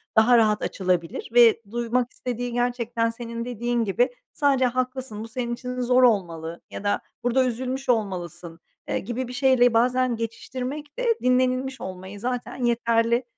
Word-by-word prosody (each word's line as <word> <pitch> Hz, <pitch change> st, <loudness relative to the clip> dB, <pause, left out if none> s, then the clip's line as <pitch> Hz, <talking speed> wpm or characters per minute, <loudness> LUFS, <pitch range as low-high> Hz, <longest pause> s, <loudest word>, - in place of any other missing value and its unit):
daha 235 Hz, +2 st, +6 dB
rahat 215 Hz, -2 st, +3 dB
açılabilir 180 Hz, -3 st, -1 dB
ve 235 Hz, -1 st, +6 dB
duymak 240 Hz, +1 st, 0 dB
istediği 245 Hz, 0 st, -4 dB
gerçekten 240 Hz, -1 st, 0 dB
senin 230 Hz, 0 st, -6 dB
dediğin 240 Hz, 0 st, -1 dB
gibi, 225 Hz, +4 st, +2 dB, 0.2 s
sadece, 275 Hz, -3 st, +3 dB
"Haklısın, 255 Hz, -3 st, -2 dB
bu -, -, -7 dB
senin 240 Hz, 0 st, -3 dB
için 250 Hz, +1 st, -5 dB
zor 250 Hz, +1 st, +4 dB
olmalı." 170 Hz, -8 st, +1 dB
ya -, -, -7 dB
da, 205 Hz, -, +1 dB, 0.2 s
"Burada 255 Hz, +2 st, +3 dB
üzülmüş 255 Hz, +2 st, -3 dB
olmalısın." 175 Hz, -6 st, -2 dB, 0.3 s
eee, -, -, 0 dB
gibi 240 Hz, +4 st, -4 dB
bir 250 Hz, -, -8 dB
şeyle 250 Hz, -2 st, +4 dB
bazen 250 Hz, +1 st, +2 dB
geçiştirmek 255 Hz, -, -5 dB
de -, -, -1 dB, 0.2 s
dinlenilmiş 255 Hz, +1 st, +1 dB
olmayı 190 Hz, +2 st, -7 dB
zaten 250 Hz, +2 st, -3 dB
yeterli, 235 Hz, 0 st, +2 dB
240 Hz, 150 wpm, -24 LUFS, 225-255 Hz, 0.3 s, daha